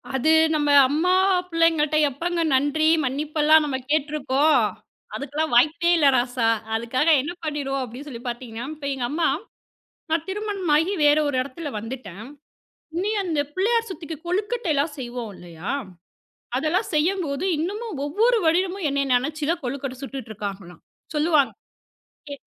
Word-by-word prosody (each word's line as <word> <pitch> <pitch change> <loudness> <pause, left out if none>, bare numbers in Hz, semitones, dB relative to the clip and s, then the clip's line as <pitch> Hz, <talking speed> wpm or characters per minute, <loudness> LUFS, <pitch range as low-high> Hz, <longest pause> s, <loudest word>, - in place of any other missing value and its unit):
அது, 265 +5 +2 0.2
நம்ம 295 -1 +1 0.2
அம்மா 320 +7 +1 0.4
பிள்ளைங்கள்ட்ட 325 -2 +2
எப்பங்க 335 +5 -2
நன்றி, 290 +4 +2 0.2
மன்னிப்பெல்லாம் 305 +3 +3
நம்ம 275 -3 -2
கேட்டுருக்கோம்? 300 0 +2 0.6
அதுக்கெல்லாம் 290 +1 -3
வாய்ப்பே 315 +7 +4
இல்ல 300 -3 +4
ராசா. 245 -1 +1 0.3
அதுக்காக 245 +7 0
என்ன 295 - -4
பண்ணிருவோம்? 280 -3 -2
அப்படின்னு 255 +4 -9
சொல்லிப் 240 -1 -8
பாத்தீங்கன்னா, 240 -1 -5
இப்ப 290 -2 -6
எங்க 260 -2 -3
அம்மா, 325 +2 +1 0.8
நான் 325 0 +1
திருமணமாகி 380 -4 0
வேற 295 +1 +5
ஒரு 285 - -1
இடத்துல 285 +4 -6
வந்துட்டேன். 220 -4 -8 0.7
இனி 385 +4 0
அந்தப் 300 -6 -2
பிள்ளையார் 460 +4 +1
சதுர்த்திக்கு 325 -3 -7
கொழுக்கட்டை 410 +2 -1
எல்லாம் 290 +2 0
செய்வோம் 240 -4 -5
இல்லையா? 170 0 -6 0.9
அதெல்லாம் 315 - 0
செய்யும் 350 +5 +1
போது 280 +4 -3
இன்னமும் 400 +2 -4
ஒவ்வொரு 450 +11 +2
வருடமும் 360 +3 +1
என்னைய 280 0 0
நினைச்சுத்தான் 305 +5 -1
கொழுக்கட்டை 260 +1 -4
சுட்டுட்டு 270 -4 -7
இருக்காங்களாம், 195 -4 -7 0.3
சொல்லுவாங்க. 300 -2 +3 0.8
எ - - -5
295 Hz, 130 wpm, -23 LUFS, 260-335 Hz, 0.9 s, வேற